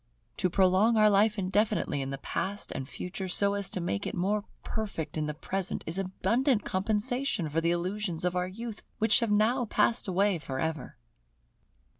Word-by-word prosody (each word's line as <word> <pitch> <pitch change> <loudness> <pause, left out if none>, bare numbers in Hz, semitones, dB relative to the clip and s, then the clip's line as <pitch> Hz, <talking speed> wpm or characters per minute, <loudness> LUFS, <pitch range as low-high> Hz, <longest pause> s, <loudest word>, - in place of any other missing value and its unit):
To 185 - +1
prolong 190 +5 +4
our 215 -1 +6
life 210 +2 +3
indefinitely 200 -5 0
in 135 - -3
the 135 - -4
Past 195 +8 -2
and 135 0 -5
Future, 185 +4 -5
so 200 +2 +3
as 200 -1 +1
to - - -3
make 135 - -2
it - - -4
more 205 +4 0 0.2
perfect 200 -9 -4
in 155 -1 -1
the 150 - -4
Present, 190 +4 -3
is 165 +4 -3
abundant 230 +5 +1
compensation 215 - 0
for 155 +2 0
the 170 - +1
illusions 180 0 -1
of 180 0 0
our 180 0 0
youth 225 +3 -7 0.2
which 220 -1 +4
have 230 - 0
now 225 +5 +2
passed 230 +1 +2
away 195 0 +2
for 135 -3 -5
ever. 160 -2 -3
195 Hz, 180 wpm, -29 LUFS, 175-215 Hz, 0.2 s, our